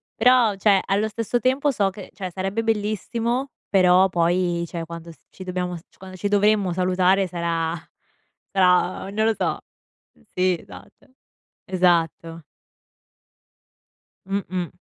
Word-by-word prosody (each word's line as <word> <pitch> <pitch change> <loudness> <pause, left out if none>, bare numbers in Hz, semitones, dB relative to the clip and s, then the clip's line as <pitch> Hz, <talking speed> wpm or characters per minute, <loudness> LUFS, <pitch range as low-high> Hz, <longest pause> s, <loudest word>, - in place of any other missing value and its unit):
Però, 245 -5 +4
cioè, 195 -1 +3
allo 200 +3 +1
stesso 230 +2 -2
tempo 265 +4 +1
so 205 -6 +1
che 195 0 -11
cioè, 185 -3 -5
sarebbe 195 +5 -2
bellissimo, 225 +4 -1 0.2
però 185 -1 +5
poi, 175 0 +1
cioè 165 0 -5
quando 170 0 -9
s - - -16
ci 190 - -11
dobbiamo 180 -1 -3
s 165 - -14
quando 185 0 -11
ci 205 - -2
dovremmo 205 -2 +2
salutare 185 +1 +2
sarà 170 -2 -2 0.8
sarà, 185 0 +2
non 215 +1 0
lo 225 - +3
so. - - -1 0.7
Sì, 185 -1 +2
esatto. - - -15 0.6
Esatto. 170 -3 0 1.8
Mh-mh. 185 -3 -3
185 Hz, 125 wpm, -23 LUFS, 180-210 Hz, 1.8 s, però